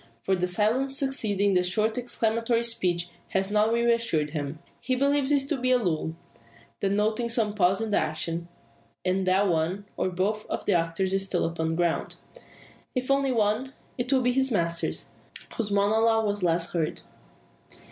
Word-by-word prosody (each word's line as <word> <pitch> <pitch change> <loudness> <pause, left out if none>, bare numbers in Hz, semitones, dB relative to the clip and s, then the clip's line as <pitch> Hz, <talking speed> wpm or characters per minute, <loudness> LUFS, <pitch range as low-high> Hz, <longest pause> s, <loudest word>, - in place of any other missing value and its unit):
For 190 - +2
the 180 0 -1
silence 235 +9 +1
succeeding 205 -8 +1
the 180 - +4
short 215 +5 +1
exclamatory 230 -1 0
speech 180 -7 -1 0.2
has 195 +1 -1
not 210 +1 +3
re 235 0 +1
assured 165 -11 -1
him. 145 -1 -4 0.2
He 255 +1 -1
believes 280 +1 +2
it 275 -2 +2
to 300 - 0
be 255 0 +1
but 250 - +4
a - - -4
lull, 160 -2 -1 0.6
denoting 210 +4 0
some 225 -3 +1
pause 190 0 +2
in 220 -1 -2
the - - +3
action, 170 0 -3 0.6
and 185 +1 0
that 190 +2 +3
one, 175 +4 0
or - - 0
both, 200 +4 -2
of - - -4
the 200 - +2
actors 170 +3 0
is 195 0 +1
still - - 0
upon 165 -1 -2
the 160 - -1
ground. 170 -1 -1 0.8
If 255 +1 -1
only 275 -1 +2
one, 225 +3 0 0.2
it 245 +1 -2
will 260 -2 +3
be 250 - +3
his 265 +1 +3
master, 170 -7 0 0.7
whose 220 -3 -2
monologue 220 +2 +3
was 205 -1 -1
last 170 -1 +1
heard. 165 -3 -1
205 Hz, 175 wpm, -26 LUFS, 180-235 Hz, 0.8 s, the